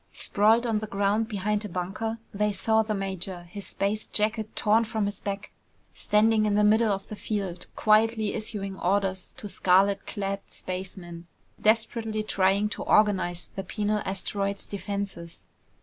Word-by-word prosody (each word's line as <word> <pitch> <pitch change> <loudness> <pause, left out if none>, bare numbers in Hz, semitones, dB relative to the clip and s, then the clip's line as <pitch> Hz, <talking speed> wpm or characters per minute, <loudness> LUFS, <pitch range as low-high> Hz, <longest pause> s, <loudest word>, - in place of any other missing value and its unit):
Sprawled 220 +4 +3
on 225 -3 +1
the 215 - -5
ground 205 +2 +1
behind 210 0 -1
a 210 - -5
bunker, 195 +6 -3 0.2
they 210 +1 +1
saw 220 +3 +2
the 215 -1 -2
major, 190 -2 -4
his 195 +4 -8
space 210 +2 -2
jacket 215 +1 0
torn 220 +2 +4
from 220 -2 -1
his 205 -1 -4
back, 200 0 -4 0.4
standing 215 0 +3
in 205 - +1
the 210 - +4
middle 215 +1 +4
of 195 0 -3
the 215 - -6
field, 195 -5 -4
quietly 215 0 +3
issuing 205 -3 -4
orders 190 0 0
to 210 - -6
scarlet 195 +1 +3
clad 195 -1 -3
spacemen, 180 -2 -7 0.3
desperately 220 0 +1
trying 195 0 +2
to 210 - -5
organize 190 -5 +2
the 195 - -3
penal 210 +2 -1
asteroid's 195 +1 -2
defenses. 200 -4 -5
205 Hz, 150 wpm, -27 LUFS, 195-215 Hz, 0.4 s, torn